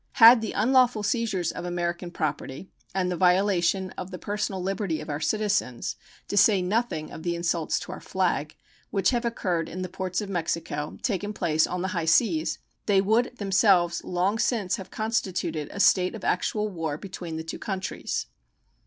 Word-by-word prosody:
Had 230 0 +9
the 220 - -3
unlawful 250 -1 +3
seizures 205 -6 0
of - - -6
American 175 0 -2
property 150 0 -4 0.2
and 180 -1 +1
the - - -1
violation 185 0 +2
of 180 - -5
the 185 - -6
personal 205 0 -3
liberty 190 -3 -2
of - - -6
our 145 - -2
citizens, 195 - 0 0.3
to - - -3
say 205 0 +6
nothing 185 -4 -1
of - - -8
the 170 0 -1
insults 170 -1 0
to - - -7
our - - -7
flag, 165 -5 -1 0.3
which 195 -1 +2
have 240 -1 0
occurred 180 -8 -1
in 185 +2 -5
the - - -3
ports 185 0 -3
of 210 - -4
Mexico 165 -5 -3
taken 205 -3 -1
place 160 -5 +2
on 180 0 -3
the 190 - -1
high 170 -3 -2
seas, 245 - +2 0.3
they 200 -2 +5
would 225 +5 +1
themselves 190 -3 +3
long 185 +5 0
since 205 -7 +1
have 190 - -8
constituted 185 -8 -2
a 200 - -7
state 185 0 +4
of 215 - -9
actual 210 +4 0
war 165 -7 -3
between 175 -3 -6
the 160 - -4
two 165 - -6
countries. 195 -2 -3
185 Hz, 180 wpm, -26 LUFS, 170-210 Hz, 0.3 s, Had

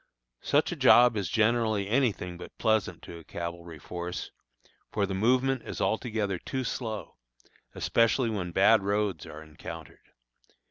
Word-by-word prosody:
Such - - +2
a - - -2
job 120 -1 +6
is 100 -5 -2
generally 110 -2 +1
any 125 +2 +3
thing 90 -2 -7
but 90 - -11
pleasant 110 -2 0
to 85 - -9
a - - -14
cavalry 85 0 -7
force, 90 +1 -6 0.6
for 105 -2 +1
the 95 - -4
movement 125 +6 +2
is - - -7
altogether 110 -5 -1
too 130 +7 -4
slow, 110 -3 -5 0.6
especially 115 +1 +2
when 90 -5 -3
bad 100 +5 +5
roads 100 -5 -1
are 80 +1 -9
encountered. 75 -1 -11
105 Hz, 145 wpm, -28 LUFS, 90-115 Hz, 0.6 s, job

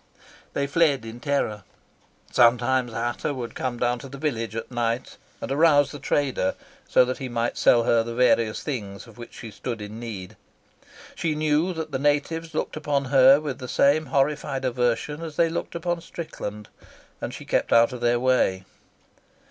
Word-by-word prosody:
They 140 - 0
fled 140 -4 +2
in 115 +1 -8
terror. 140 -7 -1 0.7
Sometimes 125 +1 +3
Ata 120 +5 -2
would 120 -3 -5
come 125 -2 -3
down 120 0 0
to 135 - -10
the 140 - -9
village 115 -7 -2
at 115 +2 -5
night 120 0 -2 0.2
and - - -5
arouse 145 -1 +4
the 145 - -8
trader, 135 -8 0 0.3
so 125 - +5
that 130 +1 -4
he 130 -2 -5
might 120 0 -1
sell 120 -1 +4
her 115 0 +3
various 115 -1 +1
things 105 -9 -5
of 115 -1 -16
which 120 - -10
she 115 -3 -8
stood 115 +2 -5
in 105 +2 -7
need. 105 -6 -7 0.8
She 160 -2 -1
knew 155 +3 +1
that 160 -2 -5
the 135 - -2
natives 150 +3 0
looked - - -2
upon 145 -2 -1
her 135 +1 +7
with 145 -4 -5
the 125 - -6
same 145 +4 +3
horrified 135 0 0
aversion 125 +4 -1
as 160 -2 -6
they 165 +1 +3
looked 170 - -4
upon 170 0 -2
Strickland, 105 -12 -7 0.5
and - - -3
she - - -9
kept - - 0
out 115 +1 +5
of 125 - -7
their 120 0 +2
way. 120 -7 +2
130 Hz, 175 wpm, -25 LUFS, 115-145 Hz, 0.8 s, her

